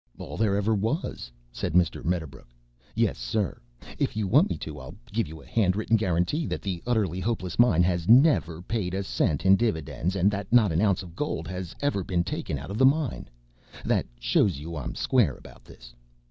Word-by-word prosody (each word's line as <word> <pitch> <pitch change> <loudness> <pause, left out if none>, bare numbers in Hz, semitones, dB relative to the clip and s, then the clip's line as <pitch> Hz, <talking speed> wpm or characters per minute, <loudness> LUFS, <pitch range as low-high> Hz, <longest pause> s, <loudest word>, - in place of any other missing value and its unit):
"All - - -7
there 105 -2 +1
ever 105 +2 +1
was," 110 - -2 0.2
said - - -4
Mr. 85 -2 +2
Medderbrook. 80 -6 -3 0.5
"Yes, - - +1
sir! 85 - -2 0.4
If - - -1
you 110 - 0
want 145 - +4
me - - -2
to 75 -2 -7
I'll 65 +2 -10 0.2
give 115 +1 0
you 80 -1 -10
a 105 +1 +1
written 105 +4 +1
guarantee 110 - 0
that - - -4
the 90 -4 -3
Utterly 105 -7 0
Hopeless 95 -3 -3
Mine 90 -8 +5
has 85 0 0
never 115 - +4
paid 95 -3 -2
a 100 - -1
cent 80 -4 -1
in 95 0 +7
dividends 90 - -1
and 95 +2 +3
that 100 0 -5
not 115 -5 +5
an 80 +3 +1
ounce 100 -3 +2
of 85 -2 -12
gold 150 +8 -3
has 90 -2 -6
ever 145 -10 0
been 85 -1 0
taken 75 - -4
out 70 +7 -8
of 105 - -4
the - - +4
mine. 145 -2 -1 0.6
That - - +1
shows 60 - +2
you 80 +4 -7
I'm 70 -5 -5
square 110 - +2
about - - -16
this. - - -15
95 Hz, 200 wpm, -26 LUFS, 85-110 Hz, 0.6 s, in